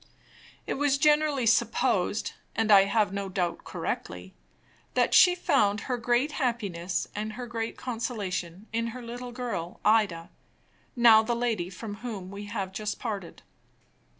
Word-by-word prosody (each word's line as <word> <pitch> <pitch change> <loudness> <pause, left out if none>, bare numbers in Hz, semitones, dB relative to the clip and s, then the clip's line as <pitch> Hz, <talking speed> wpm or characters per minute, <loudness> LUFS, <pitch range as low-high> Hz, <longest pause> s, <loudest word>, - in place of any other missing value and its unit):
It - - -3
was 290 -1 +2
generally 295 -2 +3
supposed 230 -3 +1 0.2
(and 225 -1 +1
I 195 -1 +8
have 200 -1 +1
no 200 -1 -3
doubt 180 -2 -2
correctly) - - -5 0.6
that - - +2
she 360 -1 +7
found 205 - +2
her 250 -2 -2
great 240 +5 +1
happiness 205 - -2
and 215 +1 -4
her 245 +2 -6
great 230 -1 -4
consolation 205 -7 -4
in 230 0 0
her - - -8
little 245 +1 -7
girl 230 -9 -5
Ida 205 -6 +2 0.6
now 230 -3 +7
the 235 +2 -1
lady 225 -7 -1
from 205 +2 -7
whom 205 -5 -6
we 200 +1 -7
have 200 -3 -4
just 210 +2 -4
parted. 205 -7 -6
220 Hz, 145 wpm, -28 LUFS, 195-245 Hz, 0.6 s, I